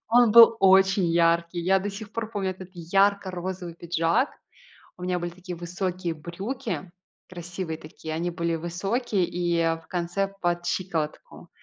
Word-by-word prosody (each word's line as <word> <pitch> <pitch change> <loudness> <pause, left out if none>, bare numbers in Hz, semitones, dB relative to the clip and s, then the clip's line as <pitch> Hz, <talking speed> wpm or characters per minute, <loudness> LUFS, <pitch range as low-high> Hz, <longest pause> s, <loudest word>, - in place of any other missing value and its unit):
он 240 0 +5
был 230 -1 +9
очень 190 -1 +5
яркий. 170 +1 +2
Я 190 +3 +3
до 205 +2 -3
сих 205 +1 -9
пор 225 -1 -4
помню 195 -4 -2
этот 185 -1 -9
ярко-розовый 185 -1 0
пиджак. 170 - +1 0.7
У 180 - -12
меня 180 0 0
были 175 0 -4
такие 180 +1 -8
высокие 175 0 -3
брюки, 190 - -5 0.4
красивые 175 -1 -5
такие, 155 0 -8
они 170 +2 -1
были 170 -1 -1
высокие 195 +5 -1
и 175 -1 0 0.2
в - - -23
конце 180 +3 -2
под 175 0 0
щиколотку. 165 -5 -3
180 Hz, 145 wpm, -26 LUFS, 170-195 Hz, 0.7 s, был